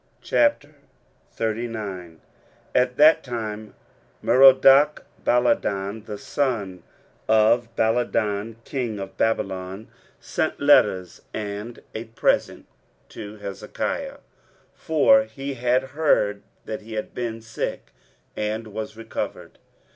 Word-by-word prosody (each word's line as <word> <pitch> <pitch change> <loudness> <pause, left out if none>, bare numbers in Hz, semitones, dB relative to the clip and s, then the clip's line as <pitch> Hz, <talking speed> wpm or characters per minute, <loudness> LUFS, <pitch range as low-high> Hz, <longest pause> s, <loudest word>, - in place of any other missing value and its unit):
23:039:001 110 - -3 0.6
At 125 0 +2
that 155 +2 +6
time 110 -4 -5 0.5
Merodachbaladan, 125 -6 +4
the 105 -1 -5
son 105 -10 -2 0.5
of 110 +2 +4
Baladan, 110 -2 0
king 120 -6 -3
of 95 -1 -7
Babylon, 95 -2 -2 0.3
sent - - -2
letters 90 -1 +3
and 105 +2 -6
a 110 +1 -5
present 115 0 0 0.4
to 105 0 -9
Hezekiah: 100 -2 -4 0.6
for 275 - +4
he 140 - -6
had 125 +1 +1
heard 135 -8 +1 0.2
that 110 - -5
he 110 +1 -10
had 110 -1 -4
been 115 -2 -4
sick, 110 0 -5 0.4
and 110 +2 -2
was 110 0 -6
recovered. 115 - -6
110 Hz, 95 wpm, -24 LUFS, 105-125 Hz, 0.6 s, that